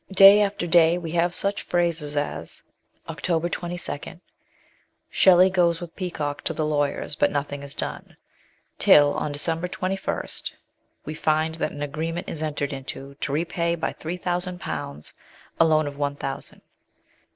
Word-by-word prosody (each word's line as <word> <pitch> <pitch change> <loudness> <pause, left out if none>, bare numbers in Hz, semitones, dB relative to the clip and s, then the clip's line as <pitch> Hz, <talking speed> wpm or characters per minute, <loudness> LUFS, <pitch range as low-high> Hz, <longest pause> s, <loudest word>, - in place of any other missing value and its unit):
Day 195 +2 +9
after 200 -3 0
day 170 0 +5
we 165 -3 -5
have 175 +1 +1
such 200 0 0
phrases 165 -4 -1
as 145 - -3 0.4
(October 165 +2 -1
22) 175 -3 -5 0.4
" - - -38
Shelley 185 0 +6
goes 170 -3 +3
with 175 -2 -9
Peacock 155 -6 -3
to - - 0
the 155 - -1
lawyers, 145 -1 -1
but 145 - +3
nothing 145 0 -3
is 140 0 -9
done/' - - -6 0.6
till 145 -1 +6
on 150 - -2
December 165 +4 -2
21 190 +1 -2 0.8
we 155 - -4
find 155 +1 +1
that 160 - -2
an 145 - -5
agreement 165 +5 -3
is 155 - -4
entered 145 -2 -2
into 135 +1 -7
to - - -2
repay 170 +2 0
by 165 - -2
three 170 +3 -5
thousand 180 0 -2
pounds 75 - -5 0.5
a 165 - +7
loan 155 -1 +3
of 140 -1 -6
one 145 0 0
thousand. 135 -1 -6
160 Hz, 155 wpm, -24 LUFS, 145-175 Hz, 0.8 s, Day